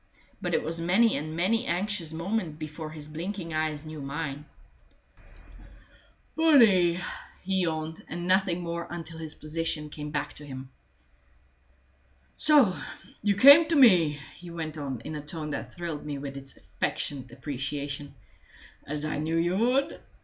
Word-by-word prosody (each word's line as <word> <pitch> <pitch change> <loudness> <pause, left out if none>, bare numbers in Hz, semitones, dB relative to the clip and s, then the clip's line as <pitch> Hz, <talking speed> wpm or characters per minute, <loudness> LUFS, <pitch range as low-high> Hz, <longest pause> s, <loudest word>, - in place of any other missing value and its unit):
But - - 0
it - - +1
was 165 +1 -1
many 200 +7 +4
and 155 +2 -4
many 220 +8 +1
an 170 - +2
anxious 190 -4 -1
moment 170 -1 -2
before 155 0 -6
his 155 -1 -7
blinking 165 +2 -5
eyes 155 -1 -1
knew 155 -1 -7
mine. 140 +1 -4 1.9
"Bunny!" 225 - +6 0.5
he 190 0 +1
yawned, 160 -1 -2
and 175 +2 -5
nothing 185 -2 +2
more 170 0 -4
until 165 -1 -7
his 160 -1 -6
position 155 -1 -2
came 150 -1 -6
back 150 - -3
to 150 - -10
him. 130 -2 -8 1.6
"So 280 -12 +4 0.4
you 205 -1 +2
came 285 +9 +9
to 330 - +1
me," 175 - +6 0.2
he 175 0 -10
went 160 -2 -5
on, 135 -6 -4
in 155 - -6
a 150 - -4
tone 150 +1 -6
that - - -5
thrilled 170 -4 -5
me 145 -1 -4
with 140 0 -6
its 135 0 -10
affectionate 130 -4 -3
appreciation, 140 +1 -4 0.7
"as 150 +1 -2
I 155 -1 -2
knew 160 +2 0
you 175 +2 +1
would! 250 +6 +1
160 Hz, 150 wpm, -28 LUFS, 150-185 Hz, 1.9 s, came